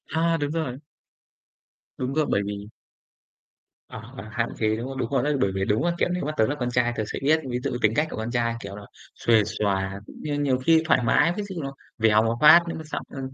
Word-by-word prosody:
A! 165 +1 +2
Đúng 145 -1 -2
rồi. 150 -6 -3 1.2
Đúng 130 +1 -3
đó, 155 +1 +2
bởi 100 - +1
vì 100 0 -5 1.2
Ờ, - - -8 0.2
ờ, 100 - -6
hạn 115 0 -1
chế, 110 -1 +2
đúng 115 +3 -5
không? 135 0 -6
Đúng - - -2
rồi 135 -3 +1
đó, 145 - 0
bởi 100 - +2
vì 95 0 0
đúng 105 +2 +1
á, 175 - +2
kiểu, - - +1
nếu 180 0 -2
mà 150 - -1
tớ 110 - +4
là 145 - -1
con 125 -1 -1
trai 120 -1 +1
tớ 110 - 0
sẽ - - -4
biết, 155 +4 +3
ví 125 0 -1
dụ - - -1
như 125 - -2
tính 105 0 +3
cách 150 +1 +2
của - - -7
con 110 +2 -3
trai, 120 -1 0
kiểu 100 -2 -8
là, 105 - -9 0.3
xuề 115 -2 +3
xòa 95 -1 -2
cũng - - -13
như 150 -1 -3
nhiều 135 -3 +2
khi 160 +5 +3
thoải 160 - +4
mái, 165 +8 +3
ví 210 - -2
dụ 200 -2 -8
như 165 - -3
nó 135 0 -5 0.2
vèo 110 -1 +4
một 115 +1 0
phát 150 +3 +9
nó - - -4
mới 160 - -7
xong, 155 - -5
ơ, 135 - -8
125 Hz, 265 wpm, -25 LUFS, 110-150 Hz, 1.2 s, phát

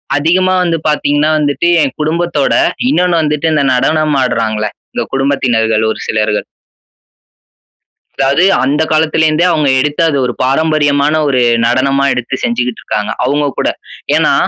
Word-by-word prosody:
அதிகமா 180 +6 +1
வந்து 170 -2 0
பாத்தீங்கன்னா 150 +1 +1
வந்துட்டு, 145 +3 0 0.2
என் 135 -2 -3
குடும்பத்தோட 160 -1 0 0.4
இன்னொன்னு 180 -8 +1
வந்துட்டு 150 +1 -1
இந்த 150 -2 +1
நடனம் 155 +3 +1
ஆட்றாங்கள, 110 -3 -1 0.3
இந்த - - -2
குடும்பத்தினர்கள் 120 -5 0
ஒரு - - -6
சிலர்கள். 105 -1 -1 1.7
அதாது 140 +6 +1 0.2
அந்த 140 +4 0
காலத்துல 160 0 +2
இருந்தே 165 +3 +1
அவங்க 150 -3 +1
எடுத்து 150 +4 -1
அது 140 - -1
ஒரு 125 - -2
பாரம்பரியமான 145 +1 +1
ஒரு 130 -3 +1 0.2
நடனமா 135 +3 +1
எடுத்து 125 +2 -3
செஞ்சுகிட்டு 120 0 -2
இருக்காங்க. 105 +1 -3
அவுங்க 145 +3 0
கூட. - - +1 0.5
ஏன்னா - - +2
145 Hz, 135 wpm, -13 LUFS, 130-155 Hz, 1.7 s, காலத்துல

